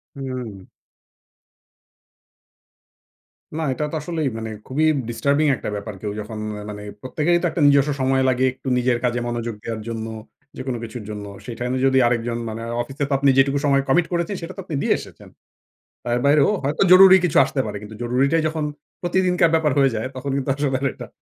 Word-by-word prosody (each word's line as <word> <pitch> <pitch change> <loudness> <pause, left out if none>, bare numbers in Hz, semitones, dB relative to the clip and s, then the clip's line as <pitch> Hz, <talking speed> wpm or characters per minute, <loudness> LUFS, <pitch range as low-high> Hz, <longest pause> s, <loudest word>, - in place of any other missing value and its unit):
হুম। 125 -7 -6 3.0
না, - - -1
এটা 150 - -3
তো - - -4
আসলেই 160 -2 -2
মানে 110 0 -5 0.2
খুবই 145 +4 0 0.3
ডিস্টার্বিং 140 +5 +1
একটা - - -5
ব্যাপার। 100 +1 -6
কেউ 105 - -3
যখন 110 +1 -7 0.3
মানে 105 0 -7 0.2
প্রত্যেকেরই 155 +6 +1
তো - - -1
একটা 170 - -2
নিজস্ব 140 +1 +4
সময় 130 0 +2
লাগে, 130 +1 +2
একটু 130 - -12
নিজের 125 -1 +2
কাজে 120 0 +1
মনোযোগ 120 -1 -3
দেওয়ার 115 -2 -4
জন্য 115 -1 -4 0.5
যেকোনো 130 -1 -3
কিছুর 115 0 -7
জন্য। 105 -1 -6 0.2
সে 120 - -6
টাইমে 125 +1 -1
যদি 130 0 +3
আরেকজন 120 0 -1
মানে 110 +1 -6 0.2
অফিসে 135 +4 -4
তো - - 0
আপনি 140 0 +3
যেটুকু 140 +1 +3
সময় 140 -1 +3
কমিট 170 +6 +4
করেছেন, 170 +3 -1
সেটা 170 +3 -7
তো - - -4
আপনি 160 - -4
দিয়ে - - +3
এসেছেন। - - -12 0.7
তার 120 0 0
বাইরেও 145 +2 +5
হয়তো 145 +6 -1
জরুরি 190 +1 +10
কিছু 170 - +1
আসতে 135 - -4
পারে। 105 - -4
কিন্তু 105 +1 -10
জরুরিটাই 135 +7 +2
যখন 155 -1 -3 0.4
প্রতিদিনকার 180 -1 +2
ব্যাপার 155 -3 +2
হয়ে 135 - +5
যায়, 110 +4 -2
তখন 135 +1 -4
কিন্তু 135 0 -3
আসলে 140 -2 0
আর - - -1
এটা - - -9
135 Hz, 180 wpm, -22 LUFS, 120-150 Hz, 3.0 s, জরুরি